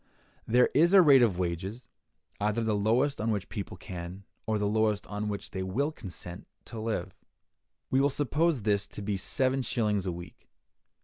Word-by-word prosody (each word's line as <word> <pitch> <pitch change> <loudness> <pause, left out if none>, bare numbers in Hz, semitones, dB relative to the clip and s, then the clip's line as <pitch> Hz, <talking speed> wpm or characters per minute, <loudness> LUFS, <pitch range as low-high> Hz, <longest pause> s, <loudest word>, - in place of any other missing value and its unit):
There 125 +2 +4
is 170 +5 +4
a 195 - +9
rate 140 -5 +7
of 110 -7 +3
wages, 95 +7 -3 0.5
either 105 +3 0
the 110 -1 +1
lowest 115 +6 +1
on 110 - 0
which 105 -3 0
the - - -24
people 100 - -5
can, 90 +1 -8 0.2
or 110 -1 +1
the 105 - -1
lowest 105 -1 +1
on 105 +1 -4
which 100 -1 -5
they 95 - -4
will 120 +12 -1
consent, 90 - -9 0.2
to 115 - -7
live. 110 0 -3 0.8
We 130 - +4
will 140 - +4
suppose 145 0 +1
this 100 -1 +1
to 105 - -8
be 100 0 -1
seven 130 +7 0
shillings 105 -6 0
a - - 0
week. 85 0 -10
105 Hz, 185 wpm, -29 LUFS, 100-130 Hz, 0.8 s, a